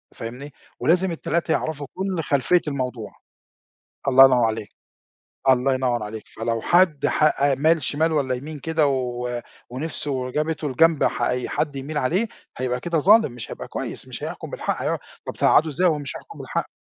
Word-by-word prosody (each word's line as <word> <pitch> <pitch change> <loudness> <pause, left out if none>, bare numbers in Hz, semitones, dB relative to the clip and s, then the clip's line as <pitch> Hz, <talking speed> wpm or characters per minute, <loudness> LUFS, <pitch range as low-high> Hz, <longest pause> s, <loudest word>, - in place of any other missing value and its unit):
فاهمني، 125 +5 -7 0.3
ولازم 175 +7 +2
ال3 165 0 -1
يعرفوا 150 -3 -1
كُلّ 185 -3 -2
خلفية 145 +6 +2
الموضوع، 125 -5 -3 1.0
الله 135 0 +9
ينوّر 125 -3 +5
عليك، 110 -1 -2 0.8
الله 130 +1 +4
ينوّر 125 -3 0
عليك، 105 0 -7
فلو 115 0 -3
حد 175 -4 +3
حأ 140 -2 +3
مال 155 +1 +2
شمال 160 +4 +1
والّا 135 -4 0
يمين 150 +3 -7
كده 160 0 +1
و 125 -2 -2 0.3
ونِفْسه 130 -1 -3
جابته 155 0 -1
لجنب 160 +3 +3
ح - - 0
أي 125 0 0
حد 145 -2 -1
يميل 145 +3 -4
عليه 175 - +1 0.3
هيبقى 125 0 -1
كده 170 +2 0
ظالم، 210 - +5
مش 120 -2 -9
هيبقى - - -7
كويس، - - -6
مش - - -8
هيحكم - - -6
بالحق، - - -3
هيقع - - 0 0.3
طَب - - -3
تقعده 160 - +4
إزاي 180 +6 +2
وهو 155 -3 +2
مش 140 - -6
هيحكم - - -13
بالحق؟ - - -3
140 Hz, 170 wpm, -23 LUFS, 125-160 Hz, 1.0 s, الله